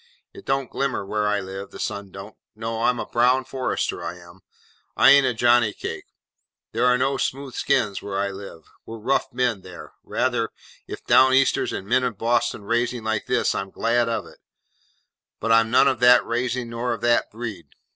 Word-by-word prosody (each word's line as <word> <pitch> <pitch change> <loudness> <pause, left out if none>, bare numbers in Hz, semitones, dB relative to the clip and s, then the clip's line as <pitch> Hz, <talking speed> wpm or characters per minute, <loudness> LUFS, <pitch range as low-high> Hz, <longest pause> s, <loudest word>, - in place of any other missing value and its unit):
It - - -13
don't 135 -1 -1
glimmer 135 -7 -2
where 105 +1 -1
I 105 0 +1
live, 95 +1 -7
the - - -11
sun 100 -2 -4
don't. 95 +3 -10 0.2
No. 115 +1 -4
I'm 125 - +2
a - - -3
brown 125 +2 +2
forester, 130 0 -3
I 90 - -5
am. 85 +1 -16 0.6
I - - +7
an't 140 -1 +6
a 125 - 0
Johnny 120 -2 +3
Cake. - - -6 0.7
There 120 +3 +1
are 125 0 +4
no 135 +2 0
smooth 135 0 -3
skins 100 -3 0
where 100 -1 -5
I 100 0 -1
live. 95 -4 -10 0.2
We're 115 - -9
rough 125 +5 -1
men 120 -5 -1
there. 90 -1 -12
Rather. 120 -3 -1 0.4
If - - -8
Down 130 0 +5
Easters 135 0 +2
and 95 - -5
men 125 +5 +2
of 120 -5 -2
Boston 115 -1 0
raising 120 +2 -1
like 110 -1 -2
this, - - +1
I'm 95 0 -4
glad 115 +3 0
of 115 - -2
it, - - -16 1.0
but 115 - -1
I'm 115 0 +4
none 130 +4 +5
of 130 -3 +1
that 125 0 +6
raising 120 0 -2
nor 120 +1 -2
of 115 - -7
that 120 0 +2
breed. 105 -8 -7
115 Hz, 195 wpm, -23 LUFS, 105-125 Hz, 1.0 s, I